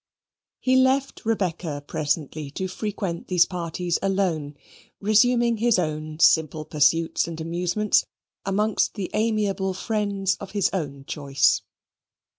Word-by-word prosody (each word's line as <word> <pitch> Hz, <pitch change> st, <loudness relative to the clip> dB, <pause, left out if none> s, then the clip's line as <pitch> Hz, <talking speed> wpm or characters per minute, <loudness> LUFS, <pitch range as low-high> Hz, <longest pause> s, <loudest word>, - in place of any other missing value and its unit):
He 260 Hz, 0 st, +3 dB
left 265 Hz, +1 st, +2 dB
Rebecca 170 Hz, -8 st, -1 dB
presently 150 Hz, -1 st, -2 dB
to 185 Hz, +6 st, -4 dB
frequent 195 Hz, -3 st, -4 dB
these 180 Hz, -2 st, +4 dB
parties 175 Hz, -1 st, -2 dB
alone, 180 Hz, -7 st, -1 dB, 0.4 s
resuming 235 Hz, +3 st, +3 dB
his 230 Hz, -1 st, +3 dB
own 155 Hz, -2 st, -3 dB
simple 160 Hz, -1 st, +3 dB
pursuits 160 Hz, +3 st, +2 dB
and 165 Hz, -1 st, -6 dB
amusements 175 Hz, +5 st, +1 dB, 0.4 s
amongst 210 Hz, +2 st, 0 dB
the 195 Hz, -4 st, -4 dB
amiable 205 Hz, -4 st, 0 dB
friends 200 Hz, -2 st, -1 dB
of 200 Hz, -, -9 dB
his 205 Hz, -3 st, +1 dB
own 140 Hz, -7 st, -4 dB
choice. 140 Hz, -3 st, +1 dB
185 Hz, 115 wpm, -24 LUFS, 155-210 Hz, 0.4 s, these